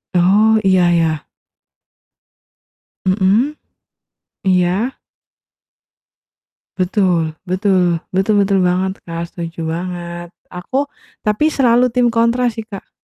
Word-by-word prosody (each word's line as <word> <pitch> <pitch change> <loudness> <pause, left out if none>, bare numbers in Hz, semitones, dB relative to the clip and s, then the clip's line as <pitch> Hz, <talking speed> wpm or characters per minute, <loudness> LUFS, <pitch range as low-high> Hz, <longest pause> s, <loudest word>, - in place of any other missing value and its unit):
Oh, 210 +5 +4
iya 185 -2 +4
ya. 165 -3 0 1.8
Mhm. 200 +9 +2 0.9
Iya. 185 +7 +1 1.8
Betul, 180 -4 +1
betul, 185 -2 +1 0.2
betul 195 +3 +2
betul 195 -1 +2
banget, 185 +2 0
Kak, 170 0 -5
setuju 170 -1 -8 0.2
banget. 175 -1 -6 0.2
Aku 265 +11 -2 0.4
tapi 210 +8 +1
selalu 250 -2 +3
tim 245 0 +2
kontra 235 +2 +2
sih, 225 0 -6
Kak. 205 -3 -10
190 Hz, 90 wpm, -17 LUFS, 175-220 Hz, 1.8 s, Oh